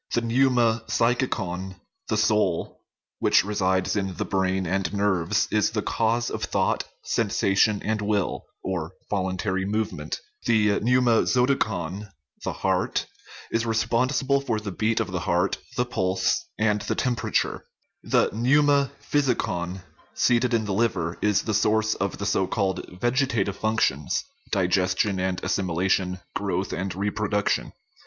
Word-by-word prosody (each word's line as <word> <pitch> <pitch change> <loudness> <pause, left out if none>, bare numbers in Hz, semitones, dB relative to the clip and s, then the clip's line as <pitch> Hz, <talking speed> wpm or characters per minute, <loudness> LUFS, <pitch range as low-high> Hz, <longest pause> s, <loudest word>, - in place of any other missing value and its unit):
The 120 - +2
pneuma 120 -1 +2
psychicon 105 -6 0 0.3
the - - 0
soul 100 -6 +1 0.4
which - - +4
resides 95 -2 0
in 95 -3 -2
the - - -2
brain 95 -1 0
and 90 0 -1
nerves, 100 -4 +1
is - - +3
the - - -2
cause 115 +1 0
of - - -4
thought, - - 0 0.2
sensation, 100 +2 +1
and 110 0 0
will 105 -2 -1 0.6
(voluntary 95 0 -1
move 105 +3 -1
ment); - - -5 0.3
the 105 -2 +3
pneuma 120 -1 +3
zoticon 105 -7 0 0.3
the - - -1
heart - - 0 0.5
is 115 - +1
responsible 125 +5 +1
for 120 -6 -1
the 105 -2 -5
beat 110 +4 0
of - - -2
the 90 - -2
heart, 90 +3 0 0.2
the 125 - +2
pulse, 95 -5 0
and 105 -1 +1
the - - -2
temperature; 125 -2 -1 0.4
the - - +2
pneuma 140 +4 +3
physicon, 95 -10 -1 0.3
seated 125 +1 +2
in 115 -2 +1
the 100 - -2
liver, 95 -6 0
is 105 -1 +2
the 110 - -2
source 110 +1 +2
of 100 0 -3
the 100 - -4
so 95 -2 +1
called 95 -1 -1 0.2
vegetative 120 -5 +1
functions, 110 -10 0 0.3
digestion 95 +1 +1
and 95 0 -1
as - - -1
similation, 90 0 0 0.2
growth - - -2
and 95 +3 -3
reproduction. 105 +1 -1
105 Hz, 135 wpm, -25 LUFS, 95-115 Hz, 0.6 s, which